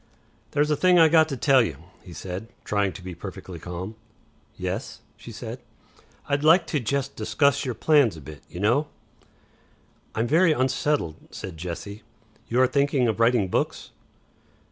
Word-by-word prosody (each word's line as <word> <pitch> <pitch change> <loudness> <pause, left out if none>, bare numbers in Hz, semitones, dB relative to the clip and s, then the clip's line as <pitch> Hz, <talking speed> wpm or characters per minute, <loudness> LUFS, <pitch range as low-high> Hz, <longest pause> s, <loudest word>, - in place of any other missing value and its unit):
"There's 150 +1 +1
a - - +3
thing 180 +4 +4
I 165 -2 +7
got 160 0 +5
to 135 - -3
tell 135 0 +5
you," 115 - -1 0.3
he 90 - -13
said, 90 +6 -6 0.2
trying 100 -2 0
to 95 - -11
be 90 0 -6
perfectly 95 0 -8
calm. 90 +5 -6 0.6
"Yes?" - - -4
she - - -11
said. - - -7 0.7
"I'd 145 0 0
like 165 +4 +6
to 150 - +2
jest 140 +3 -2
discuss 140 +7 +1
your 125 -3 -3
plans 140 - +3
a - - -10
bit, 75 0 -11
y'know." 115 - +1 1.3
"I'm 110 - +1
very 160 +6 +4
unsettled," 130 - 0
said 95 -3 -8
Jessie. 85 +5 -6 0.5
"You 120 - 0
are 130 - +5
thinking 140 -2 +2
of 110 0 -1
writing 115 -3 +3
Books?" - - -2
120 Hz, 160 wpm, -25 LUFS, 95-145 Hz, 1.3 s, I